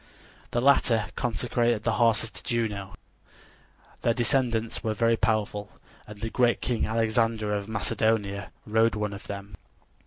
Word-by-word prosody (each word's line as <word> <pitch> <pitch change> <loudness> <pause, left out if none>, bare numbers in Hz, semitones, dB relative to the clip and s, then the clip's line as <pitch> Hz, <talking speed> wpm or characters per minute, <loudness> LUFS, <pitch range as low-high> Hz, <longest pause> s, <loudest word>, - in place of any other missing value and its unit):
The 120 - 0
latter 125 -5 +3
consecrated 120 -1 0
the 115 - +1
horses 115 -1 +3
to - - -8
Juno. 105 -5 -2 1.1
Their 115 - +2
descendants 120 -3 0
were 110 -1 -1
very 115 +1 +3
powerful, 105 -2 -1 0.3
and 105 -1 -11
the 115 0 -3
great 120 -2 +3
king 120 -3 -1
Alexander 110 -1 +1
of 100 -1 -2
Macedonia 105 -2 0
rode 110 +1 +3
one 105 -1 -2
of 100 - -9
them. 100 0 -7
110 Hz, 135 wpm, -27 LUFS, 105-115 Hz, 1.1 s, latter